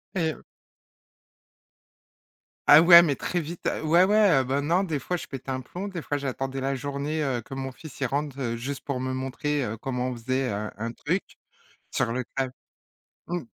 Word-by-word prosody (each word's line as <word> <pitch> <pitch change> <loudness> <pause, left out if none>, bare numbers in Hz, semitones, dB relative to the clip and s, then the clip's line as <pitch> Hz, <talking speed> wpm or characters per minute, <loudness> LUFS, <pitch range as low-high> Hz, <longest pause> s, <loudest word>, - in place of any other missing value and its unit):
Et 160 -4 +1 2.3
Ah 150 +2 +10
ouais, 170 0 +10
mais 145 -5 +1
très 175 - -2
vite. 165 +2 -7 0.2
Ouais, 170 +4 +5
ouais, 210 0 +5
heu, - - 0
ben 135 +3 0
non, 170 +6 +2
des 155 -5 -2
fois 180 +7 -2
je - - -7
pétais 135 -1 -7
un 130 0 -2
plomb, 180 +10 -6
des 175 -5 -5
fois 145 - -2
j'attendais 135 0 -3
la 135 +1 0
journée, 145 +3 -2
heu, 130 -4 0
que 135 - -9
mon 135 -1 -4
fils 155 +1 -12
il 135 - +2
rentre, 140 +1 -2
heu, 115 -3 -2
juste 135 +4 -5
pour 135 -3 -2
me 130 0 -2
montrer, 135 +2 -2
heu, 110 +1 -3
comment 125 0 -2
on 125 - -3
faisait, 130 +2 -1
heu, 105 +1 -3
un 115 +2 -4
truc. 170 +10 -1 0.7
Sur 115 - 0
le 130 +1 -1
clav 130 -1 -1 0.8
mmh. 175 -2 -2
140 Hz, 195 wpm, -26 LUFS, 130-160 Hz, 2.3 s, Ah